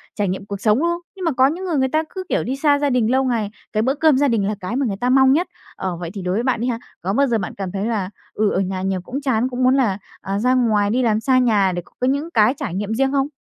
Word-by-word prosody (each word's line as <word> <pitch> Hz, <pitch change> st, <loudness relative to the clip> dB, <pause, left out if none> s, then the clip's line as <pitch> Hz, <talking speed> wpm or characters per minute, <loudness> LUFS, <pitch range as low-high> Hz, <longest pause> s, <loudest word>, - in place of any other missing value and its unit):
trải 205 Hz, -2 st, 0 dB
nghiệm 190 Hz, +2 st, -4 dB
cuộc 200 Hz, -1 st, -6 dB
sống, 215 Hz, +3 st, +3 dB
đúng 340 Hz, -, +1 dB
không? 345 Hz, 0 st, -1 dB, 0.2 s
Nhưng 375 Hz, -2 st, -5 dB
mà 330 Hz, -, +2 dB
có 260 Hz, 0 st, +4 dB
những 350 Hz, +6 st, -3 dB
người 340 Hz, -5 st, -1 dB
người 265 Hz, -1 st, +2 dB
ta 310 Hz, +3 st, +1 dB
cứ, 375 Hz, -1 st, -6 dB
kiểu, -, -, +1 dB
đi 260 Hz, +3 st, -2 dB
xa 285 Hz, 0 st, +2 dB
gia 290 Hz, -, +1 dB
đình 245 Hz, -3 st, +1 dB
lâu 265 Hz, +1 st, +3 dB
ngày, 230 Hz, -5 st, -1 dB, 0.2 s
cái 215 Hz, -, +1 dB
bữa 265 Hz, +3 st, +1 dB
cơm 305 Hz, -2 st, +4 dB
gia 285 Hz, -, +3 dB
đình 220 Hz, -6 st, +1 dB
là 210 Hz, -, -1 dB
cái 190 Hz, +5 st, -4 dB
mà 275 Hz, 0 st, +1 dB
người 195 Hz, -4 st, -2 dB
ta 250 Hz, -, +1 dB
mong 265 Hz, 0 st, +5 dB
nhất. 345 Hz, +5 st, +1 dB, 0.3 s
Ờ, 185 Hz, -3 st, -4 dB
vậy 170 Hz, -1 st, -5 dB
thì 200 Hz, -, -6 dB
đối 180 Hz, 0 st, -2 dB
với 225 Hz, +5 st, 0 dB
bạn 250 Hz, -3 st, 0 dB
đi 245 Hz, -, 0 dB
ha, 235 Hz, -2 st, -1 dB, 0.2 s
có 190 Hz, +2 st, -1 dB
bao 280 Hz, +5 st, +3 dB
giờ 235 Hz, -3 st, +1 dB
bạn 185 Hz, -, -4 dB
cảm 195 Hz, -2 st, -4 dB
thấy 195 Hz, +2 st, -3 dB
là, 210 Hz, -5 st, -1 dB, 0.2 s
ừ, 210 Hz, -1 st, +1 dB
ở -, -, 0 dB
nhà 190 Hz, -1 st, -2 dB
nhiều 190 Hz, -1 st, -1 dB
cũng 260 Hz, +10 st, -5 dB
chán, 255 Hz, -2 st, +1 dB
cũng 250 Hz, 0 st, -2 dB
muốn 255 Hz, +1 st, +4 dB
là, 225 Hz, -8 st, +1 dB, 0.2 s
à, 195 Hz, +1 st, -2 dB
ra 250 Hz, +4 st, +2 dB
ngoài 215 Hz, -5 st, +2 dB
đi 245 Hz, +5 st, +1 dB
làm 220 Hz, -2 st, +2 dB
xa 255 Hz, +3 st, +2 dB
nhà 210 Hz, -6 st, +3 dB
để 175 Hz, -1 st, -3 dB
có -, -, -23 dB
cái 255 Hz, -, +2 dB
những 285 Hz, +5 st, -1 dB
cái 220 Hz, +2 st, +4 dB
trải 255 Hz, -, -4 dB
nghiệm 205 Hz, +3 st, -2 dB
riêng 270 Hz, +2 st, +1 dB
không? 275 Hz, -1 st, +1 dB
240 Hz, 325 wpm, -20 LUFS, 200-270 Hz, 0.3 s, mong